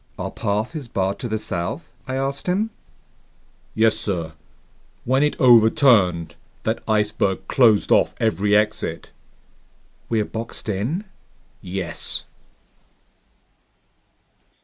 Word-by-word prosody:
"Our - - -4
path 105 +9 -2
is 145 -5 -5
barred 95 -3 -1
to 120 - -4
the 110 -1 -1
south?" 85 -3 -4
I 130 - -3
asked 135 +3 -2
him. 205 +5 0 1.0
"Yes, 110 -1 +4
sir. 90 -8 -3 0.7
When 130 +3 +2
it 150 0 +1
overturned, 110 - +5 0.3
that 110 +1 -1
iceberg 105 -3 0
closed 115 -6 +4
off - - +4
every 105 -1 +2
exit." 105 -6 0 1.0
"We're 110 -2 +1
boxed 115 +2 -6
in?" 115 - -2 0.6
"Yes." 90 0 -4
110 Hz, 105 wpm, -22 LUFS, 95-125 Hz, 1.0 s, overturned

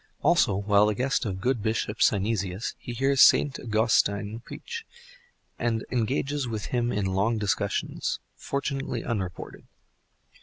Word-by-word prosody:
Also, 100 - +4
while 100 +1 +3
the 105 - 0
guest 130 +1 0
of 95 -3 -3
good 125 +2 0
Bishop 110 0 -2
Synesius, 100 -1 +1
he - - -7
hears 135 +3 +2
Saint 140 -3 +5
Augustine 110 -2 +1
preach, 460 - -8 0.8
and 115 -2 -1
engages 135 +3 -1
with 110 -3 -4
him 120 -1 +1
in 100 -1 -1
long 100 +5 +1
discussions, 100 -1 -1 0.2
fortunately 135 -3 -3
unreported. 95 -7 -5
110 Hz, 125 wpm, -27 LUFS, 100-125 Hz, 0.8 s, Saint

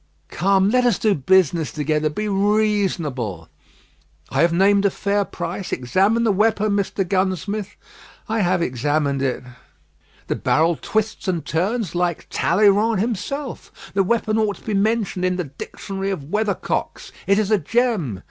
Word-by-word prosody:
"Come, 195 +3 +2
let 250 +1 +3
us 240 -6 +3
do 215 -2 +2
business 170 0 +2
together. 155 0 0
Be 210 +8 -3
reasonable." 195 - 0 0.8
"I 135 - +1
have 170 0 +4
named 195 +3 +3
a 200 - +4
fair 200 +1 0
price. 190 - -5
Examine 195 - +1
the 225 - +3
weapon, 215 +1 +2
Mr. 200 -1 -1
Gunsmith." 195 +2 -1 0.5
"I 220 0 -1
have 180 -3 +2
examined 140 +1 0
it." 130 -2 -1 0.8
"The - - -2
barrel 165 +3 +2
twists 220 -1 -2
and 175 -4 -1
turns 190 +3 -1
like 175 -2 -1
Talleyrand 205 +3 +3
himself. 240 +6 -5
The 195 - +2
weapon 220 +1 0
ought 210 -2 +1
to - - -18
be 215 - -2
mentioned 205 -2 0
in 185 0 +1
the 180 - -2
Dictionary 195 +7 -6
of 155 -6 -5
Weathercocks. 210 -2 -2 0.2
It 200 0 +4
is 215 -1 0
a 215 - +4
gem." 190 - 0
195 Hz, 150 wpm, -21 LUFS, 165-215 Hz, 0.8 s, have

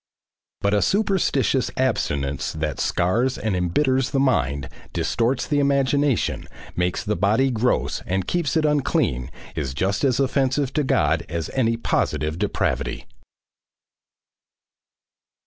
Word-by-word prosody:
But 100 0 +1
a 105 - +3
superstitious 180 - +1
abstinence 70 - -1
that 80 -3 -3
scars 120 - +1
and 110 -3 -1
embitters 130 - +1
the 135 - 0
mind, 70 - +1 0.3
distorts 115 +9 0
the 145 - +1
imagination, 140 -1 +1 0.3
makes 90 0 -1
the 105 +1 -1
body 110 +7 +2
gross 125 +1 0
and 95 0 -1
keeps 170 - 0
it 155 - +2
unclean, 130 - +1 0.3
is 70 -4 -3
just 95 +5 0
as 130 -3 +2
offensive 135 0 +1
to 150 - +1
God 80 - +2
as 85 0 -3
any 115 -3 +1
positive 75 - -1
depravity. 95 -9 -1
115 Hz, 120 wpm, -23 LUFS, 85-135 Hz, 0.3 s, a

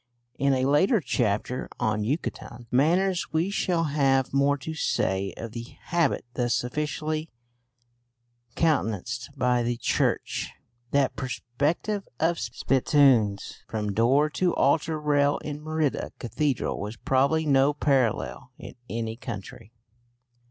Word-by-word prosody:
In 140 0 +3
a 130 0 +1
later 170 - +4
chapter 125 - -1
on 105 -1 0
Yucatecan 120 -1 -4
manners 175 +8 +2
we 165 +5 0
shall 175 -4 +1
have 135 -4 +1
more 140 +1 +3
to 150 +4 -6
say 95 -10 0
of 115 -1 -6
the 115 +1 -8
habit 170 -7 0
thus 120 -1 0
officially 155 +4 -3 1.3
countenanced 120 - 0
by 125 -1 +2
the 120 0 -1
Church. - - -1 0.4
That 140 0 +1
perspective 140 - -2
of 165 +1 +1
spittoons 120 -3 +2
from 105 -2 -2
door 130 +8 +3
to 175 +3 +1
altar 155 +3 +2
rail 145 -1 +2
in 150 0 -6
Merida 155 -2 -1
Cathedral 135 -3 -1
has 110 +2 -8
probably 140 +7 +2
no 140 -1 +4
parallel 135 -6 0
in - - -10 0.2
any 115 -1 -3
country. 110 -3 -8
135 Hz, 120 wpm, -26 LUFS, 120-155 Hz, 1.3 s, later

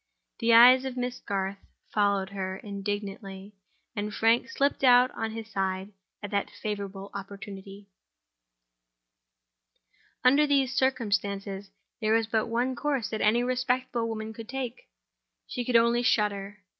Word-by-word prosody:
The 230 0 +2
eyes 250 +3 +8
of 260 -1 -5
Miss 250 0 -3
Garth 195 0 -3 0.3
followed 200 -2 +1
her 190 -1 -4
indignantly; 200 -1 -6 0.4
and 210 0 -3
Frank 225 +4 +2
slipped 275 +1 0
out 250 0 +6
on 225 - -3
his 220 0 -7
side 190 -1 -3 0.3
at 205 - -5
that 200 -1 0
favorable 200 -2 -6
opportunity. 200 0 -9 2.4
Under 280 +4 +5
these 275 -3 +2
circumstances, 200 -6 -1 0.3
there 215 -1 +1
was 225 0 +3
but 220 +1 0
one 245 +3 0
course 275 -5 -1
that 220 - -3
any 230 +3 +3
respectable 250 -1 0
woman 220 0 -5
could 225 0 -10
take—she 255 -1 -8
could 245 0 -2
only 235 +1 +4
shudder. 205 -3 0
220 Hz, 130 wpm, -28 LUFS, 200-245 Hz, 2.4 s, eyes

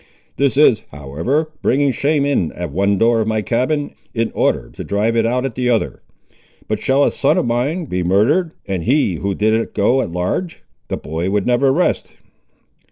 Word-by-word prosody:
This 140 -1 +2
is, 125 -7 +5
however, 80 - -2
bringing 140 +2 +2
shame 140 +3 +1
in 135 - 0
at 90 -4 -5
one 100 +5 +1
door 115 +2 +3
of 110 - -1
my 110 -1 0
cabin, 135 +6 0 0.2
in 115 0 0
order - - 0
to - - -7
drive 105 +3 0
it 115 -1 +2
out 125 +2 0
at 135 - -3
the 125 +1 -1
other. 115 -3 0 0.7
But 110 -1 -1
shall 135 +2 +2
a - - +2
son 140 - +1
of - - +1
mine 130 +9 -1
be 90 -9 -2
murdered, 130 - +2
and 95 -4 -3
he 120 - +2
who 100 +3 -2
did 110 +2 +2
it 115 +1 -1
go 125 +6 +3
at - - -3
large?—the 90 - -4
boy 80 +4 -3
would 100 0 0
never 125 +2 +3
rest!" 175 +7 0
115 Hz, 190 wpm, -18 LUFS, 100-140 Hz, 0.7 s, is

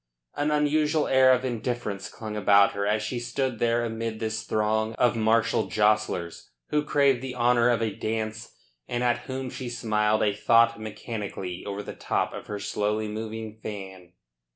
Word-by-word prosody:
An 145 +1 0
unusual 150 +1 +2
air 130 -1 +6
of 130 0 +2
indifference 120 -4 -3
hung 110 -2 -7
about 100 -1 +5
her 100 0 -2
as 105 0 +1
she 120 +4 -3
stood 125 -1 -2
there 120 0 +2
amid 115 -1 -4
this 110 0 -2
throng 110 0 0
of 120 -1 +2
martial 115 0 +2
jostlers 105 -5 0 0.2
who 150 0 +1
craved 140 -4 +3
the 130 -1 -5
honour 120 0 +3
of 115 -2 +2
a 110 -3 -1
dance 110 0 -3 0.4
and 120 0 -2
at 120 0 +2
whom 130 -1 -4
she 130 -2 -5
smiled 110 -2 +1
a 105 - +2
thought 115 +2 +4
mechanically 105 -4 -5
over 100 0 -4
the - - -7
top - - -1
of - - -8
her 105 - -4
slowly 105 +1 -1
moving 110 0 -6
fan. 95 -4 -8
110 Hz, 170 wpm, -26 LUFS, 105-120 Hz, 0.4 s, air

